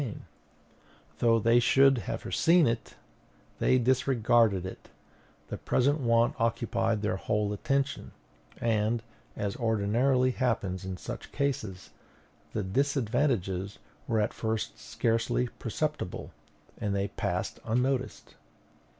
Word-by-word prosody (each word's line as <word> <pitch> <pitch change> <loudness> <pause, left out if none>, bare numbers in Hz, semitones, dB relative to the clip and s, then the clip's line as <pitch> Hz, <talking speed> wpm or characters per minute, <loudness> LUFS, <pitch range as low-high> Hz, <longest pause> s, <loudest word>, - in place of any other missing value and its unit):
And 120 -7 -5 1.0
though 115 -1 +4
they 115 +2 +4
should 135 +1 +5
have - - -3
foreseen 170 0 +3
it, 115 -2 -2 0.6
they 130 - +4
disregarded 120 -6 +3
it; 95 - -9 0.6
the - - -5
present 140 +4 +2
want 115 -2 +3
occupied 115 -1 0
their 105 -2 0
whole 105 +1 -1
attention, 140 +6 -1 0.5
and, 115 0 +1 0.3
as 100 -1 -2
ordinarily 120 +3 +2
happens 100 -8 -1
in 95 -1 -4
such - - -7
cases, 110 -10 -3 0.6
the 105 - -2
disadvantages 115 -5 0 0.3
were 110 - +1
at 105 +1 0
first 110 -1 -3
scarcely 115 +2 0
perceptible, 150 - -3 0.5
and 100 -1 -1
they 100 0 -1
passed - - -3
unnoticed. 130 +3 -1
115 Hz, 110 wpm, -29 LUFS, 105-130 Hz, 1.0 s, should